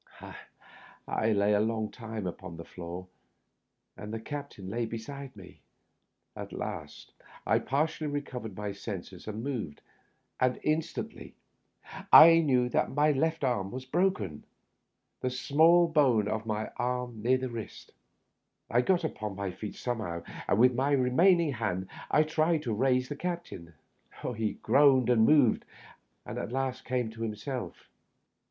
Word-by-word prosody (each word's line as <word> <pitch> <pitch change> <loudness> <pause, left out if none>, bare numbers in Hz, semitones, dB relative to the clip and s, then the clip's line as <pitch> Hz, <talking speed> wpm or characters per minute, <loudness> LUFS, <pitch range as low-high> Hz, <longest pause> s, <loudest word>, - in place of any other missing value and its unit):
I 110 +1 0
lay 100 0 +3
a 105 - +3
long 110 0 -1
time 110 -4 -6
upon 90 -1 -6
the 85 - -8
floor, 90 +1 -8 0.9
and 105 0 -8
the 115 - -4
captain 140 -6 -7
lay 115 +4 -2
beside 130 +4 -7
me. 95 -4 -14 0.7
At - - -7
last - - -7 0.3
I - - +3
partially 155 +3 -1
recovered 130 -8 -5
my 105 -1 -3
senses 100 -2 -7
and 110 +1 -5
moved, 120 - -4 0.6
and 125 0 +1
instantly 155 +1 -3 0.8
I 165 +1 +10
knew 130 -6 +2
that - - +1
my 150 +2 +3 0.3
arm 120 -8 0
was 130 +4 -7
broken 130 - 0 0.4
— - - -52
the 130 - 0
small 160 +7 +4
bone 135 -10 +3
of 110 +1 -2
the - - -7
left 105 +1 -4
forearm 125 -2 -2
near 125 +4 +3
the 130 0 -4
wrist. 115 -2 -8 0.8
I 120 +2 +4
got 180 +5 +2
upon 105 -10 -4
my 100 -1 -3
feet 105 +3 -7
somehow, 105 -9 -4 0.2
and - - +2
with 125 +2 +5
my 135 +4 +1
remain 140 +8 +4
ing 160 -3 0
hand 95 -6 -2 0.2
I 155 - +4
tried 155 0 +1
to 115 - -2
raise 130 +3 +2
the 145 - -5
captain. 170 - -6 0.6
He 110 -1 -1
groaned 130 0 +5
and 110 -2 +5
moved, 145 -7 +4 0.6
and - - -5
at - - -5
last 130 0 -2
came 125 -3 -1
to 115 0 -11
himself. 115 +3 -5
125 Hz, 150 wpm, -29 LUFS, 105-140 Hz, 0.9 s, I